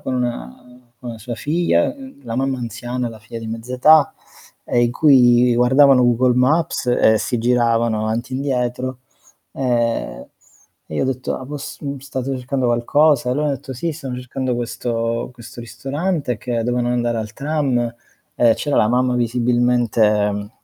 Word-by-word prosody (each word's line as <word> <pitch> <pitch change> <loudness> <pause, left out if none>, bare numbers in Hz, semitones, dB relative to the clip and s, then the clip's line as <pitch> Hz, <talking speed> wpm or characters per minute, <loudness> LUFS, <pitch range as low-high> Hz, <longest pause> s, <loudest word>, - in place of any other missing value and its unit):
con 130 - -3
con, - - +1
mhmm, 125 - -7 0.2
con 120 -3 -7
sua 120 +2 -6
figlia, 165 - +1 0.3
la 115 -2 -5
mamma 135 0 -1
anziana, 120 +1 -4
la 115 -1 -11
figlia 110 +2 -9
di 115 - -7
mezza 115 +3 -6
età, 155 +5 +5 0.5
ehm, 120 - +1
in 120 0 +1
cui 125 -4 +5
guardavano 130 +2 +5
Google 120 +1 +3
Maps 135 +3 +1
e 110 -3 +3
si 120 - -2
giravano 115 -2 +1
avanti 115 +4 -3
e - - -1
indietro, 130 -1 -2 0.5
ehm, 120 - -1 0.6
e - - -6
io - - 0
ho 130 - 0
detto: 130 -1 -2
"Ah 130 - -7
poss 145 +1 -7
mhmm, 140 -1 -5
state 135 0 -4
cercando 130 0 -2
qualcosa?", 125 +3 +2
e - - +2
loro 150 +3 0
hanno 145 - 0
detto:" 135 +1 -9
Sì, 165 +7 -3
stiamo 135 -5 -6
cercando 125 0 -3
questo 115 0 -3
questo 120 0 -13
ristorante", 140 +3 -3
che 120 +2 -3
dovevano 120 +1 -1
andare 120 -1 0
al 110 -1 -5
tram 135 -5 -1 0.5
e 115 -2 +5
c'era 145 +3 -2
la - - +4
mamma 125 +1 +1
visibilmente 115 -4 +1
125 Hz, 165 wpm, -19 LUFS, 120-130 Hz, 0.6 s, età